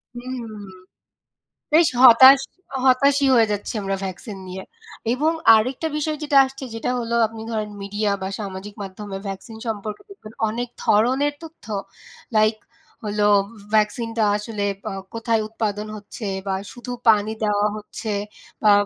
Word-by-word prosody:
হুম। 245 -2 -6 1.2
বেশ 325 +1 +6
হতাশ, 260 +2 +9 0.5
হতাশি 275 +2 +4
হয়ে 225 -2 +5
যাচ্ছি 205 -1 -3
আমরা 195 0 -1
ভ্যাকসিন 195 +2 -7
নিয়ে। 185 +1 -7 0.5
এবং 300 +5 +1 0.2
আরেকটা 255 +8 0
বিষয় 305 0 -1
যেটা 290 -2 +2
আসছে 265 +1 -9
যেটা 225 - -2
হলো 235 0 -2
আপনি 225 0 -10
ধরেন 215 -2 -2
মিডিয়া 205 +1 -1
বা 190 - -2
সামাজিক 200 0 -6
মাধ্যমে 195 +1 -7
ভ্যাকসিন 195 +3 -7
সম্পর্কে 215 -1 -4
দেখবেন 310 - -12 0.2
অনেক 240 +3 -3 0.2
ধরনের 260 +7 +3
তথ্য 325 0 -12 0.7
লাইক 215 +1 +4 0.5
হলো 210 0 +1 0.2
ভ - - -16 0.2
ভ্যাকসিনটা 225 +1 +1
আসলে 210 0 -4 0.5
কোথায় 230 -1 0
উৎপাদন 215 -1 -3
হচ্ছে 210 +1 -8 0.2
বা 190 - 0 0.2
শুধু 245 0 -8 0.2
পানি 215 0 +3
দেওয়া 210 0 +2
হচ্ছে 210 +1 -5 0.5
বা 210 - +7
220 Hz, 135 wpm, -22 LUFS, 210-250 Hz, 1.2 s, হতাশ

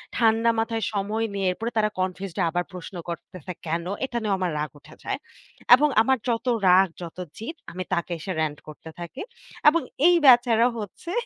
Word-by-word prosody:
ঠান্ডা 225 0 +3
মাথায় 225 0 -1
সময় 210 +3 -1
নিয়ে 195 -1 -1
এরপরে 225 +6 -4
তারা 215 0 +3
কনফিউজড 185 -1 -3
আবার 175 +2 -1
প্রশ্ন 180 +1 -8
করতেছে 175 0 -7
কেনো? 170 +2 -2 0.2
এটা 240 -2 -4
নিয়েও 205 -2 +1
আমার 180 -2 0
রাগ 150 - -2
উঠে - - -16
যায়। - - -2 0.6
এবং 295 +3 +2
আমার 260 +3 +3
যত 230 +1 -1 0.2
রাগ 185 +2 +6
যত 170 0 -8 0.2
জিৎ 235 +9 -6 0.2
আমি 185 +1 -4
তাকে 175 -1 -1
এসে 190 - -5
রেন্ট 150 -2 -2
করতে 155 +1 -10
থাকি। 175 +11 -7 0.5
এবং 335 +2 +1 0.3
এই 355 - +6
বেচারা 240 -2 +6
হচ্ছে 210 - -7
200 Hz, 175 wpm, -25 LUFS, 175-230 Hz, 0.6 s, রাগ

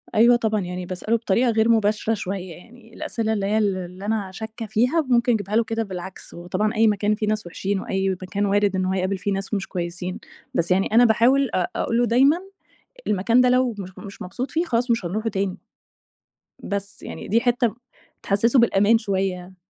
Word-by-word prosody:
أيوه 235 +3 +6
طبعًا، 220 -2 0
يعني 180 0 -5
باسأله 185 +5 -1
بطريقة 230 +3 +1
غير 220 +1 +2
مباشرة 220 0 +2
شوية 190 -3 -4
يعني، 230 +5 -17
الأسئلة 220 -1 -2
اللي 200 -2 -1
هي 210 +2 +1
ال 205 -3 +1
اللي 185 +2 -7
أنا 210 -3 -1
شاكة 220 +2 -7
فيها 245 +10 +2
ممكن 245 -3 +2
أجيبها 205 -1 -2
له 230 - +4
كده 225 0 -2
بالعكس، 190 -2 -8
وطبعًا 185 +6 -2
أي 220 +1 +4
مكان 210 0 +1
فيه 215 0 -3
ناس 215 -3 -1
وحشين 195 +3 -2
وأي 195 0 -1
مكان 190 +2 -2
وارد 200 0 +2
إن 185 0 0
هو 185 - 0
هيقابل 190 +1 -1
فيه 200 +2 -2
ناس 195 +2 -4
مش 195 -2 -1
كويسين، 180 0 -4 0.3
بس 170 +2 0
يعني 190 +1 +3
أنا 240 +2 +7
باحاول 245 +4 +4
أق 180 -2 0
أقول 230 - 0
له 240 - +3
دايمًا 265 +7 +4 0.7
المكان 220 +5 +3
ده 250 - +5
لو 250 -1 +2
مش 185 -2 -6
مش 200 -2 -9
مبسوط 250 +8 -5
فيه 330 +2 0
خلاص 245 -5 0
مش 230 -5 +1
هنروحه 215 +6 -2
تاني، 195 -2 -2 1.1
بس، 200 0 -5
يعني - - -7
دي 230 +4 +2
حتة 245 -1 +2
م 220 - -7 0.5
تحسّسه 230 +6 +2
بالأمان 220 -1 +4
شوية. 190 -4 -3
210 Hz, 200 wpm, -23 LUFS, 190-230 Hz, 1.1 s, أنا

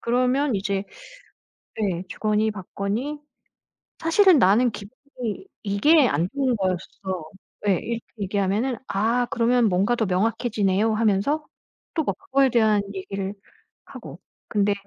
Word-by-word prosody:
그러면 255 +3 +1
이제 195 0 -1 1.0
네 185 -4 -1
주거니 215 +1 0
받거니 210 +9 -4 0.8
"사실은 340 0 +5
나는 230 +4 +4
기분이 235 - -7 0.2
이게 255 +8 +4
안 165 +5 +1
좋은 265 -4 +1
거였어." 185 -2 -3 0.4
예 195 - +5
이렇게 230 -1 -4 0.2
얘기하면은 205 +5 -1
"아 230 +5 +1
그러면 240 0 +3
뭔가 195 +5 +2
더 225 -3 0
명확해지네요." 210 +1 +1
하면서 225 +8 +1 0.5
또 315 - 0
막 - - -2
그거에 270 0 +2
대한 220 -3 +3
얘기를 195 +1 -4 0.5
하고. - - -10 0.3
근데 205 -2 +2
215 Hz, 270 characters per minute, -24 LUFS, 195-250 Hz, 1.0 s, 사실은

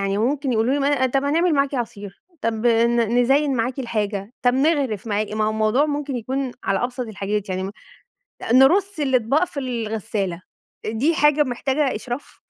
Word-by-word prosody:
يعني 195 0 -1
ممكن 270 +4 0
يقولوا 230 +4 +2
لي 285 - 0
ما 280 - +2
أنا 270 -3 +2
طب 270 +2 0
هنعمل 330 +4 +2
معاكِ 280 0 +1
عصير، 205 -5 -5 0.2
طب 225 0 -1
ن 235 0 +3
نزين 270 +2 +2
معاكِ 245 +4 -1
الحاجة، 210 -4 -3
طب 245 0 +3
نغرف 270 - +1
معاكِ، 210 0 -1
ما 215 0 0
هو 215 - +1
الموضوع 220 +6 +2
ممكن 290 -2 -3
يكون 260 +2 -3
على 195 +4 0
أبسط 250 +1 -4
الحاجات 210 -1 -3
يعني 185 0 -2
م 190 - -4 0.8
نرُصّ 340 +8 +4
الأطباق 265 +3 +2
في 285 -5 -6
الغسالة، 220 -7 -3 0.4
دي 235 +10 +1
حاجة 295 -1 +4
محتاجة 270 +1 -1
إشراف؟ 245 +5 -7
245 Hz, 175 wpm, -22 LUFS, 215-280 Hz, 0.8 s, نرُصّ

